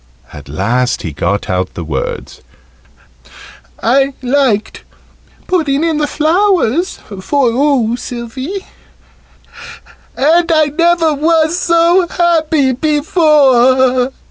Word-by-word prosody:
At 75 Hz, -1 st, -12 dB
last 120 Hz, -, -1 dB
he 80 Hz, -, -4 dB
got 100 Hz, +8 st, -2 dB
out 90 Hz, 0 st, -3 dB
the 85 Hz, -, -5 dB
words 80 Hz, -1 st, -5 dB, 1.4 s
"I 270 Hz, +3 st, +1 dB
liked 250 Hz, -5 st, 0 dB, 0.6 s
putting 310 Hz, -5 st, 0 dB
in 325 Hz, -2 st, 0 dB
the 295 Hz, -, 0 dB
flowers 345 Hz, -, 0 dB
for 235 Hz, +7 st, -2 dB
oo, 250 Hz, -3 st, +1 dB
Sylvie 260 Hz, -, -7 dB, 1.5 s
and 335 Hz, +4 st, +2 dB
I 310 Hz, -1 st, +3 dB
never 335 Hz, -1 st, +2 dB
was 320 Hz, +2 st, +1 dB
so 345 Hz, +1 st, +2 dB
happy 320 Hz, -6 st, +1 dB
before." 265 Hz, -4 st, +2 dB
285 Hz, 95 wpm, -13 LUFS, 240-330 Hz, 1.5 s, I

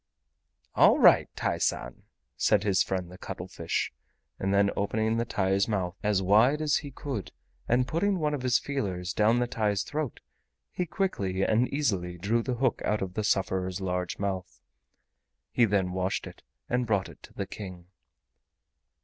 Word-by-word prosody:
"All -, -, +6 dB
right, -, -, +6 dB
TAI -, -, -1 dB
SAN," 60 Hz, -1 st, -1 dB, 0.3 s
said 105 Hz, +8 st, +3 dB
his 100 Hz, -3 st, +3 dB
friend 90 Hz, -2 st, -2 dB
the 90 Hz, -, -12 dB
cuttlefish, 85 Hz, -4 st, -3 dB, 0.5 s
and 95 Hz, -, 0 dB
then 100 Hz, 0 st, +3 dB
opening 110 Hz, +3 st, 0 dB
the 115 Hz, -, 0 dB
TAI'S 95 Hz, -3 st, +1 dB
mouth 95 Hz, -5 st, -1 dB
as 105 Hz, -2 st, +1 dB
wide 110 Hz, +10 st, +4 dB
as 155 Hz, -2 st, +2 dB
he 145 Hz, -, -6 dB
could 135 Hz, -5 st, -5 dB, 0.4 s
and 125 Hz, +2 st, +2 dB
putting 190 Hz, +6 st, +1 dB
one 150 Hz, -3 st, 0 dB
of 145 Hz, -, -2 dB
his 125 Hz, -2 st, +3 dB
feelers 95 Hz, -10 st, -3 dB
down 110 Hz, +4 st, +3 dB
the 120 Hz, -, +2 dB
TAI'S 105 Hz, -4 st, 0 dB
throat, 150 Hz, -5 st, -4 dB, 0.5 s
he 180 Hz, -, -2 dB
quickly 100 Hz, -, -1 dB
and 115 Hz, +5 st, +3 dB
easily 95 Hz, -12 st, -1 dB
drew 105 Hz, +7 st, +1 dB
the 125 Hz, +1 st, -2 dB
hook 130 Hz, 0 st, 0 dB
out 105 Hz, -2 st, 0 dB
of 90 Hz, -1 st, -5 dB
the 105 Hz, -, -2 dB
sufferer's 95 Hz, -2 st, 0 dB
large 90 Hz, -1 st, -2 dB
mouth. 95 Hz, -2 st, -4 dB, 0.9 s
He 120 Hz, -, +4 dB
then 95 Hz, -4 st, +1 dB
washed 95 Hz, +1 st, -1 dB
it -, -, -11 dB, 0.3 s
and 125 Hz, 0 st, 0 dB
brought 100 Hz, -4 st, +1 dB
it -, -, -14 dB
to -, -, -14 dB
the 100 Hz, -, -3 dB
King. 90 Hz, -3 st, -8 dB
100 Hz, 165 wpm, -28 LUFS, 95-120 Hz, 0.9 s, All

